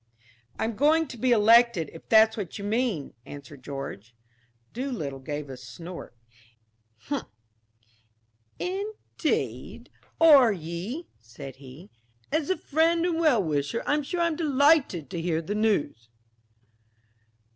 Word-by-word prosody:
"I'm 225 0 -2
going 310 +6 +3
to - - -7
be 245 +2 0
elected, 230 -6 +5
if 165 - -13
that's 220 0 +6
what 200 -4 -5
you 200 - -7
mean," 215 - -1
answered 145 0 -11
George. 125 -5 -7 0.6
Doolittle 230 - -4
gave 145 +2 -5
a 135 - -7
snort. 165 +4 -10 2.4
"Indeed, 400 +4 -3 0.3
are 285 -8 +7
ye?" 185 - -5
said 120 +3 -11
he. 140 +7 -13 0.4
"As 310 -1 0
a 375 - +1
friend 330 +3 +2
and 335 -2 0
well 290 -11 +3
wisher, 150 +6 -1
I'm 295 +1 +1
sure 345 +5 -3
I'm 335 -2 +1
delighted 285 - +3
to 170 - -3
hear 165 -1 0
the 165 +5 -4
news." 195 - 0
215 Hz, 120 wpm, -26 LUFS, -, 2.4 s, are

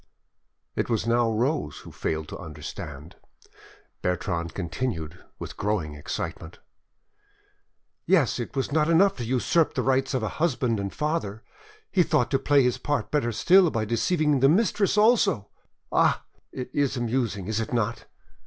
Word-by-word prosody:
It - - -1
was 115 -2 0
now 115 0 +2
Rose 125 +8 -1
who - - -12
failed 80 -1 -3
to - - -6
understand; 75 -2 -8 0.8
Bertrande 85 -2 -2
continued, 90 -3 -4
with - - -7
growing 100 -8 -1
excitement— 75 +3 -6 1.5
"Yes, 155 - +3
it 120 - -5
was 135 0 -1
not 155 +1 +2
enough 195 +4 +4
to 120 - -4
usurp 130 +7 +1
the - - 0
rights 135 +1 +1
of 125 - -1
a - - 0
husband 125 -9 +1
and 100 -1 -3
father, 130 -9 -2 0.5
he 190 - +4
thought 125 -7 +1
to 135 - +2
play 140 0 +4
his 125 -1 +1
part 145 0 -1 0.3
still 185 - +6
better - - +2
by 110 -1 -1
deceiving 145 - +1
the 135 +1 +5
mistress 200 +2 +2
also.... 210 - +3 0.4
Ah! - - +2 0.3
it 125 -1 -6
is 140 -2 +1
amusing, 115 -5 -1
is 110 +2 -1
it 110 - -3
not? 115 -1 -1
120 Hz, 155 wpm, -26 LUFS, 100-150 Hz, 1.5 s, still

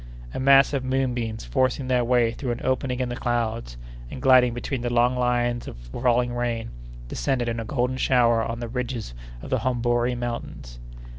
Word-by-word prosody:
A - - -4
mass 135 +1 +5
of 135 -2 -1
moonbeams 125 - -2
forcing 130 - 0
their 125 -1 +2
way 120 -1 +3
through 120 0 -3
an 120 - -7
opening 130 -1 -1
in 125 - -1
the 120 - -3
clouds, 115 - -2 0.3
and - - -7
gliding 130 -2 +5
between 120 +2 -4
the 120 0 -2
long 120 +1 +3
lines 120 -1 0
of - - -8
falling 120 - 0
rain, 120 -2 -2 0.4
descended 120 - -1
in 115 0 -2
a 115 - -4
golden 125 +1 -1
shower 120 -3 +3
on 115 +1 -4
the 120 - -3
ridges 120 - -4 0.3
of - - -8
the - - +2
Hombori 120 -1 0
Mountains. 70 - -6
120 Hz, 180 wpm, -24 LUFS, 115-125 Hz, 0.4 s, mass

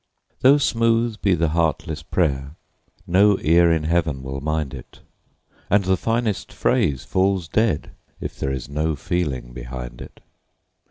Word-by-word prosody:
Though 135 +3 +6
smooth 115 -4 +1
be 95 -3 +3
the 85 -1 +1
heartless 80 -1 -1
prayer, 70 -3 -1 0.5
no 100 +2 +4
ear 85 +2 +4
in 80 -1 +1
Heaven 80 -4 0
will 70 +1 -5
mind 75 -2 -2
it, 65 -3 -12 0.7
And 100 +1 +4
the 95 0 +3
finest 115 +1 -1
phrase 70 -4 0
falls 95 -2 +1
dead 105 -4 0 0.3
if - - -7
there 65 - -1
is 65 -2 -4
no 75 +2 -1
feeling 70 -6 -3
behind - - -7
it. - - -12
80 Hz, 145 wpm, -22 LUFS, 70-100 Hz, 0.7 s, Though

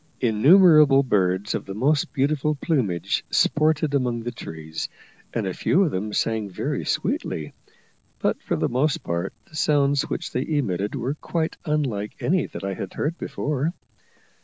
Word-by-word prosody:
Innumerable 145 - +6
birds 95 -3 +1
of - - -4
the 95 - -5
most 145 +8 +1
beautiful 150 +1 +1
plumage 125 - 0
sported 155 -1 +2
among 125 -4 0
the 120 - -3
trees, 80 -7 -6 0.4
and 115 -3 -2
a 95 - -2
few 190 - +2
of 165 - 0
them 105 +1 -3
sang 110 -1 -1
very 90 - -3
sweetly, 75 -1 -2 0.6
but - - -1
for - - -1
the - - 0
most 135 +5 0
part 85 +2 -2 0.2
the - - -15
sounds 145 -2 +2
which - - -3
they 125 - -1
emitted 110 - -1
were 130 +1 -2
quite 160 +1 -3
unlike 135 -10 -1
any 180 +2 +1
that - - -8
I 100 0 -2
had - - -6
heard 165 +4 -2
before. 150 +4 -2
135 Hz, 160 wpm, -24 LUFS, 105-150 Hz, 0.6 s, Innumerable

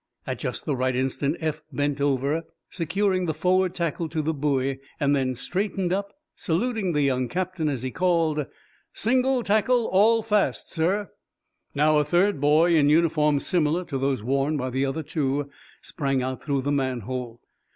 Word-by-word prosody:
At - - -4
just - - -4
the 145 - 0
right 130 0 0
instant 135 +4 -1
Eph 155 -2 -2
bent 145 +1 -1
over, 140 +3 +1 0.3
securing 185 +2 0
the 160 - -1
forward 185 +2 +1
tackle 170 -1 -2
to 155 0 -2
the 160 +2 0
buoy, 135 -2 0 0.2
then 140 -3 +1
straightened 185 - -2
up, 200 +1 -2 0.2
saluting 195 +1 -1
the 150 -1 +2
young 130 -2 +1
captain, 180 -1 -2
as 130 -4 -3
he 130 - -3
called: 165 -5 +1 0.5
"Single 255 +2 +2
tackle 225 +3 +2
all 220 +4 +4
fast, 210 -1 0
sir." 190 +5 0 0.6
Now, 150 +1 +4
a - - +3
third 175 +2 +1
boy, 155 +4 +4
in 145 -2 +4
uniform 150 -2 +3
similar 170 +2 0
to 140 -6 -4
those 135 -4 -1
worn 135 +5 0
by 130 -2 -3
the 135 +2 0
other 150 +4 -3
two, 140 -1 -2 0.3
sprang 135 -2 -1
out 130 0 -4
through 140 -3 -1
the 145 - -1
manhole. 125 -3 -3
150 Hz, 165 wpm, -25 LUFS, 135-180 Hz, 0.6 s, all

